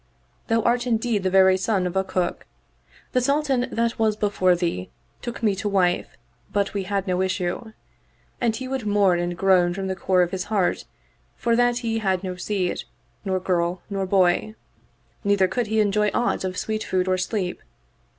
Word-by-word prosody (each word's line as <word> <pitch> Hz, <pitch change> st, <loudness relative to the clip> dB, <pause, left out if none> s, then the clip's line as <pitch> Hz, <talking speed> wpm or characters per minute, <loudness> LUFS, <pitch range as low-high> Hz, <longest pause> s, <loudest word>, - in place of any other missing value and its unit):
Thou 225 Hz, -1 st, +2 dB
art 240 Hz, +1 st, +1 dB
indeed 225 Hz, -2 st, +1 dB
the 185 Hz, -, 0 dB
very 190 Hz, 0 st, +5 dB
son 190 Hz, -1 st, 0 dB
of 180 Hz, +1 st, -3 dB
a 190 Hz, -, +2 dB
cook. 185 Hz, -2 st, -2 dB, 0.6 s
The 255 Hz, -, +2 dB
Sultan 275 Hz, -1 st, +1 dB
that 230 Hz, 0 st, -1 dB
was 220 Hz, -1 st, +2 dB
before 200 Hz, -4 st, +2 dB
thee 170 Hz, -, -2 dB, 0.3 s
took 235 Hz, -1 st, -6 dB
me 210 Hz, -3 st, +3 dB
to 205 Hz, +1 st, -2 dB
wife 180 Hz, -3 st, +1 dB, 0.3 s
but 200 Hz, -1 st, 0 dB
we 200 Hz, -2 st, -2 dB
had 195 Hz, 0 st, -1 dB
no 185 Hz, -1 st, 0 dB
issue; 190 Hz, +4 st, -2 dB, 0.7 s
and 230 Hz, -2 st, +1 dB
he 260 Hz, +2 st, -5 dB
would 260 Hz, -4 st, -3 dB
mourn 200 Hz, -4 st, +3 dB
and 175 Hz, 0 st, -2 dB
groan 180 Hz, -1 st, +3 dB
from 195 Hz, 0 st, -3 dB
the 190 Hz, 0 st, -2 dB
core 185 Hz, -1 st, +2 dB
of 175 Hz, -, -2 dB
his 190 Hz, -1 st, -3 dB
heart 200 Hz, -4 st, 0 dB, 0.5 s
for 235 Hz, -1 st, +1 dB
that 245 Hz, 0 st, +3 dB
he 225 Hz, 0 st, 0 dB
had 190 Hz, -3 st, 0 dB
no 185 Hz, -1 st, -4 dB
seed, 185 Hz, -1 st, -2 dB, 0.4 s
nor 190 Hz, -2 st, 0 dB
girl 180 Hz, -1 st, -1 dB
nor 195 Hz, -1 st, -1 dB
boy; 190 Hz, +3 st, +2 dB, 0.7 s
neither 200 Hz, -2 st, +3 dB
could 240 Hz, +3 st, -2 dB
he 220 Hz, +1 st, +1 dB
enjoy 210 Hz, 0 st, +2 dB
aught 240 Hz, -, 0 dB
of 185 Hz, -1 st, -3 dB
sweet 215 Hz, 0 st, -2 dB
food 185 Hz, 0 st, 0 dB
or 185 Hz, 0 st, +1 dB
sleep. 185 Hz, -1 st, -2 dB
195 Hz, 185 wpm, -24 LUFS, 185-220 Hz, 0.7 s, very